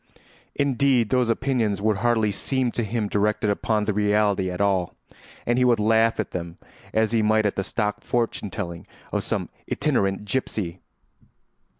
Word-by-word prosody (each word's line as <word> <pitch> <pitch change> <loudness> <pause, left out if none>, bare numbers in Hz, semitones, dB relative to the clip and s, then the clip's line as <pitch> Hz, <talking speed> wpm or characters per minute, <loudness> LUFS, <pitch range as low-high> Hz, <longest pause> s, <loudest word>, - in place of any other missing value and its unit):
Indeed, 135 -4 +2
those 125 -2 +2
opinions 115 -5 0
would 105 0 +1
hardly 110 0 +2
seem 130 +4 0
to 120 - -2
him 110 0 -1
directed 105 +1 +1
upon 105 +1 0
the 105 - 0
reality 105 -2 +2
at 90 - -5
all, 95 -3 +1 0.5
and 120 +1 +2
he - - +4
would 120 -2 +4
laugh 110 +1 +3
at 105 - -2
them 85 -1 -5 0.3
as 110 0 +1
he 115 -1 +2
might 110 0 +3
at 100 - +1
the 95 - -1
stock 105 +1 -2
fortune 115 -3 -1
telling 85 -5 -6 0.2
of - - -1
some - - -2 0.2
itinerant 105 -9 0
gypsy. 100 -6 -2
105 Hz, 165 wpm, -24 LUFS, 100-120 Hz, 0.5 s, he